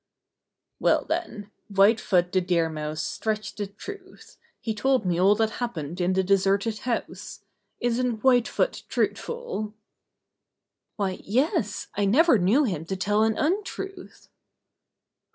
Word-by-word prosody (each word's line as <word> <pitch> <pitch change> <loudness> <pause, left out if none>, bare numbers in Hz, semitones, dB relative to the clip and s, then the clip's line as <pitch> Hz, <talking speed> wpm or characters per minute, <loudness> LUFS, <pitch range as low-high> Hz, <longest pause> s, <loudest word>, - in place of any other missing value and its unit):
"Well, - - +2
then. 230 - -4 0.2
White 205 +2 +4
Foot 180 -3 +1
the 185 - +2
Deer 170 -2 +1
Mouse 155 0 -4
stretched 215 -1 -3
the 205 -1 -3
truth. 375 - -11 0.2
He 225 - -3
told 255 +1 +1
me 175 -1 +1
all 195 +3 +5
that 220 0 +1
hap 240 -3 -2
pened 160 +3 -5
in 180 +1 +2
the 190 0 +2
deserted 200 +3 +1
house. 245 -2 -4 0.4
Isn't 240 -1 -1
White 250 -3 +4
Foot - - -1
truthful?" 470 - -2 1.2
"Why, 195 -3 -2
yes, 245 - 0
I 205 - 0
never 260 - +5
knew 210 +12 +4
him 180 - -2
to 190 - -3
tell 205 +3 +1
an 220 0 +2
un 355 +7 +1
truth." 390 -1 -8
210 Hz, 140 wpm, -26 LUFS, 190-255 Hz, 1.2 s, all